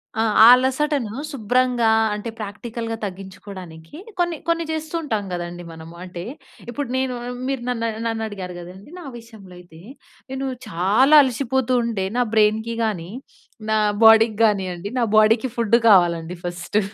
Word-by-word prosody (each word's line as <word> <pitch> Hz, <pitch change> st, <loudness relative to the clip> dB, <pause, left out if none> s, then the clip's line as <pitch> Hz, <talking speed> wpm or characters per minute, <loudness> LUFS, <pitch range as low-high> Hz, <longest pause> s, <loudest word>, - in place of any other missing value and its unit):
ఆ! 220 Hz, -, 0 dB, 0.2 s
ఆ -, -, +10 dB
అలసటను 260 Hz, -2 st, -1 dB, 0.2 s
శుభ్రంగా 245 Hz, -1 st, +1 dB, 0.3 s
అంటే 210 Hz, +2 st, -6 dB
ప్రాక్టికల్‌గా 225 Hz, +2 st, -6 dB
తగ్గించుకోవడానికి 190 Hz, -, -10 dB, 0.2 s
కొన్ని 345 Hz, -2 st, 0 dB
కొన్ని 335 Hz, 0 st, 0 dB
చేస్తూ 315 Hz, +1 st, -4 dB
ఉంటాం 220 Hz, -8 st, -2 dB
కదండీ 175 Hz, 0 st, -6 dB
మనము. 160 Hz, +1 st, -12 dB
అంటే 180 Hz, -1 st, -8 dB, 0.5 s
ఇప్పుడు 275 Hz, +3 st, -4 dB
నేను 260 Hz, -1 st, -1 dB, 0.3 s
మీరు 270 Hz, -2 st, -2 dB
నన్ను, 230 Hz, -2 st, -1 dB, 0.2 s
నన్ను 225 Hz, -1 st, -2 dB
అడిగారు 190 Hz, -4 st, -7 dB
కదండీ? 180 Hz, +5 st, -12 dB
నా 345 Hz, -, -10 dB
విషయంలో 220 Hz, -5 st, -15 dB
అయితే 175 Hz, -2 st, -16 dB, 0.5 s
నేను 265 Hz, 0 st, -3 dB, 0.2 s
చాలా 210 Hz, -, +3 dB
అలసిపోతూ 260 Hz, 0 st, -1 dB
ఉంటే 220 Hz, -5 st, -2 dB
నా 250 Hz, -, +3 dB
బ్రెయిన్‍కి 220 Hz, +2 st, +2 dB
కానీ, 180 Hz, -6 st, -3 dB, 0.6 s
నా 220 Hz, -, +2 dB, 0.3 s
బాడీకి 225 Hz, 0 st, +6 dB
కానియండి 195 Hz, -4 st, 0 dB
నా 245 Hz, -, +2 dB
బాడీకి 220 Hz, +3 st, +4 dB
ఫుడ్ 230 Hz, -2 st, +2 dB
కావాలండి 175 Hz, -4 st, +3 dB
ఫస్టు. 175 Hz, +3 st, -2 dB
220 Hz, 140 wpm, -21 LUFS, 185-250 Hz, 0.6 s, ఆ